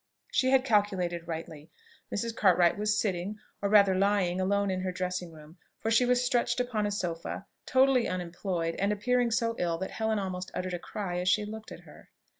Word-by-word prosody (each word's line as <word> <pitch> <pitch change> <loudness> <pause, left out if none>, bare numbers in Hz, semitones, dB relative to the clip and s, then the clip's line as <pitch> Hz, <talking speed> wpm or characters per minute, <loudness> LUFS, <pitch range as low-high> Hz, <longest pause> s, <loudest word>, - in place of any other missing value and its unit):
She 260 - +2
had 265 0 +4
calculated 190 -7 +1
rightly. 160 -2 -6 0.4
Mrs. 230 +2 -2
Cartwright 180 -5 +4
was 210 0 0
sitting, 195 0 -2 0.2
or 200 - 0
rather 200 -2 +6
lying, 190 -2 +1
alone 200 +1 +1
in 185 0 -2
her 185 0 -2
dressing 180 -1 -3
room; 155 +2 -14 0.2
for 225 - -2
she 245 +2 +4
was 250 0 +2
stretched 245 -1 +1
upon 230 -4 0
a - - -2
sofa, 175 -1 -4 0.2
totally 260 -1 +4
unemployed, 175 -1 -2
and 200 +2 +1
appearing 245 +4 +1
so 230 0 0
ill 170 -1 0
that 190 +2 -5
Helen 220 -1 -1
almost 185 -2 -4
uttered 185 0 -3
a 175 - -2
cry 180 -2 -4
as 180 +1 +1
she 210 +3 +2
looked 220 +1 -8
at - - -9
her. - - -16
200 Hz, 195 wpm, -29 LUFS, 180-220 Hz, 0.4 s, rather